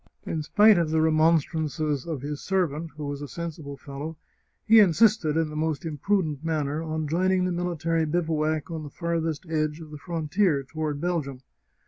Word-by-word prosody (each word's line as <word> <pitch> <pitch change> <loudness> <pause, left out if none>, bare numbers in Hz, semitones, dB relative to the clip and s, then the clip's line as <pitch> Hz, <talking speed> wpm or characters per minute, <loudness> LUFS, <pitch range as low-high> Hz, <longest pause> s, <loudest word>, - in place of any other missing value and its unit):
In 160 - -2
spite 205 +5 +5
of 165 -2 0
the 160 0 +2
remonstrances 155 -2 +1
of 150 -6 -4
his 145 0 -4
servant, 170 -4 -1
who 150 - -5
was 145 0 -4
a 145 - -5
sensible 155 -3 -6
fellow, 145 +4 -7 0.5
he 225 0 +7
insisted, 200 -4 +4
in 160 -2 0
the - - -7
most 155 0 -1
imprudent 155 -1 -1
manner, 155 -2 -1
on 155 -1 -3
joining 185 +3 +2
the 185 - 0
military 165 -2 0
bivouac 155 -1 -1
on 160 -1 -4
the 150 - -7
farthest 165 0 -2
edge 155 -1 -1
of 155 -2 -11
the 150 - -8
frontier 165 -1 0
toward 150 0 -4
Belgium. 150 -7 -2
160 Hz, 170 wpm, -26 LUFS, 150-170 Hz, 0.5 s, he